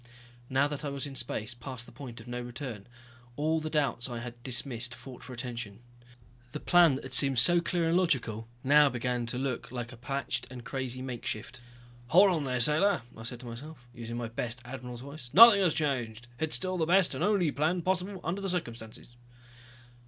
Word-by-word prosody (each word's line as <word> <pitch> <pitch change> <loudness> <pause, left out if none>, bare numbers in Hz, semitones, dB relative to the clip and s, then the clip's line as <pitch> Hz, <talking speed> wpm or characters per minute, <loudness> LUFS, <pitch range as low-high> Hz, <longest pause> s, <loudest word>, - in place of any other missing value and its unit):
Now 135 +2 +3
that 145 0 -5
I 145 - -2
was 140 0 -4
in 140 - -7
space, 120 -2 -2
past 120 0 -6
the - - -14
point 125 -5 -9
of 115 - -12
no 120 0 -4
return, 120 -4 -7 0.5
all 155 +3 +1
the 155 0 -4
doubts 145 -5 0
that 125 - -6
I - - -4
had 120 0 -8
dismissed 125 -1 -2
fought 130 -2 -11
for 130 - -10
attention. 120 -4 -5 0.8
The 150 - -4
plan 175 -5 +5
that 135 - -6
had 130 - -7
seemed 135 0 +4
so 170 +9 +6
clear 170 -1 0
and 165 - +2
logical 120 - 0 0.2
now 145 +2 +6
began 125 -1 -2
to 125 - -3
look 130 -2 -3
like 120 -1 -5
a 125 - -11
patched 125 0 -3
and 125 -1 -9
crazy 130 -1 -4
makeshift. 120 -1 -5 0.5
"Hold 190 +7 +6
on 160 -5 0
there, 125 -2 -1
sailor," 150 - +4
I - - -10
said 120 +1 -6
to - - -11
myself. 125 +3 -9
Using 120 -1 -6
my 120 -1 -3
best 115 +1 -4
admiral's 125 -1 -7
voice. 140 -2 -9
"Nothing 220 -1 +10
has 175 -5 +2
changed. 120 -6 -1
It's 160 -1 +1
still 185 -1 -1
the 160 - +1
best 185 +1 +4
and - - -2
only 195 -7 +2
plan 165 +5 0
possible 185 +1 -1
under 180 +5 -2
the 195 - -2
circumstances." 120 -8 -5
130 Hz, 205 wpm, -30 LUFS, 120-155 Hz, 0.8 s, Nothing